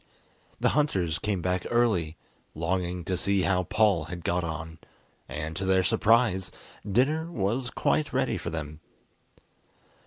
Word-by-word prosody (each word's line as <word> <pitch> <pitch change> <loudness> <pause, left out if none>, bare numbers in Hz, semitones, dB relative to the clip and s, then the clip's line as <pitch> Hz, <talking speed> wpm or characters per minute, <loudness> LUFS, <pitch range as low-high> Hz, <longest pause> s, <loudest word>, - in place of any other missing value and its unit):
The - - +3
hunters 95 - +1
came 100 -4 -2
back 90 -1 0
early, 100 -10 +1 0.4
longing 90 +2 -1
to 95 - -1
see 100 +1 +1
how 90 -2 +1
Paul 105 -7 +2
had 85 0 -7
got 90 0 0
on, 80 0 -5 0.5
and, 75 +1 -4
to 95 - -3
their 95 0 +3
surprise, 105 -4 +3 0.4
dinner 155 - +1
was 120 - -1
quite 150 +4 0
ready 130 0 0
for - - -4
them. 75 -2 -5
95 Hz, 135 wpm, -27 LUFS, 85-115 Hz, 0.5 s, The